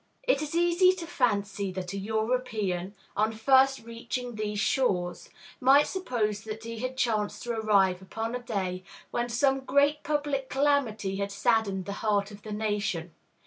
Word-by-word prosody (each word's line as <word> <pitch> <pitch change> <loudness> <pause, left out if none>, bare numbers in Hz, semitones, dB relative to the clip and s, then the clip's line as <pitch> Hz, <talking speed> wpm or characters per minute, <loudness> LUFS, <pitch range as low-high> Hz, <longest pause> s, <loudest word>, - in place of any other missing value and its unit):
It 305 - +2
is 305 +1 -4
easy 345 +2 +4
to 360 -2 -6
fancy 205 - 0
that 180 0 -5
a - - -3
European, 215 -3 -1 0.2
on 215 +2 +2
first 265 +3 +4
reaching 235 +1 -5
these 210 -1 -3
shores, 195 -5 0 0.3
might 275 +3 +6
suppose 225 - -2
that 220 0 -7
he 230 0 -6
had 255 +2 -4
chanced 215 -5 0
to 240 - -3
arrive 200 -5 +2
upon 225 +4 -4
a 250 - -2
day 190 -6 -3 0.3
when 240 0 -1
some 270 +3 +2
great 285 +3 +2
public 290 -3 -1
calamity 260 -9 +1
had 200 0 -2
saddened 200 -3 +1
the 200 - -4
heart 205 -2 +1
of 205 0 -11
the 215 - -8
nation. 205 -6 -2
220 Hz, 160 wpm, -28 LUFS, 200-265 Hz, 0.3 s, might